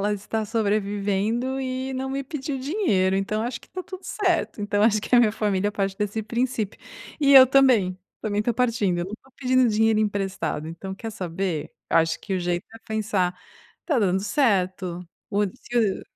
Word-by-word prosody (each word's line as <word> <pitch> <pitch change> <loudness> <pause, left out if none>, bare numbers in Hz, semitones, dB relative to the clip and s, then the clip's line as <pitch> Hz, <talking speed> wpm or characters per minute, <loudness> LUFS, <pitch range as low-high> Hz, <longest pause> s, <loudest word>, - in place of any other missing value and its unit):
ela 205 +1 +1
está 215 +2 -3
sobrevivendo 210 +3 0
e 260 0 -3
não 265 +1 -3
me 275 +1 -3
pediu 280 -1 -4
dinheiro. 260 - +1
Então, 210 +3 -1
acho 235 +1 -4
que - - -19
está 370 - -6
tudo 375 +1 -9
certo.". 360 - 0
Então, 205 0 0
acho 215 -1 +4
que 245 - 0
a - - +8
minha 225 -3 +4
família 205 -2 0
parte 195 -1 -2
desse 210 +1 -2
princípio 235 -2 -2 0.4
e 280 -1 +5
eu 265 -1 +10
também, 250 -9 +4 0.2
também 210 -1 -1
estou 235 +3 0
partindo. 225 -7 +1
Eu 175 - -1
não 190 - -8
estou 260 +4 -11
pedindo 255 -1 +3
dinheiro 220 0 +3
emprestado, 195 -7 -2
então, 175 +4 -7
quer 225 +3 -6
saber? 180 -4 -3 0.2
Eu - - +2
acho 165 0 +1
que 195 - -3
o 185 - -1
jeito 175 0 -1
é - - -10
pensar: 200 -5 -1 0.4
"Está 300 -7 0
dando 190 -2 +2
certo, 185 - 0 0.2
o 205 0 +2
se 230 -1 -1
215 Hz, 185 wpm, -24 LUFS, 195-255 Hz, 0.4 s, eu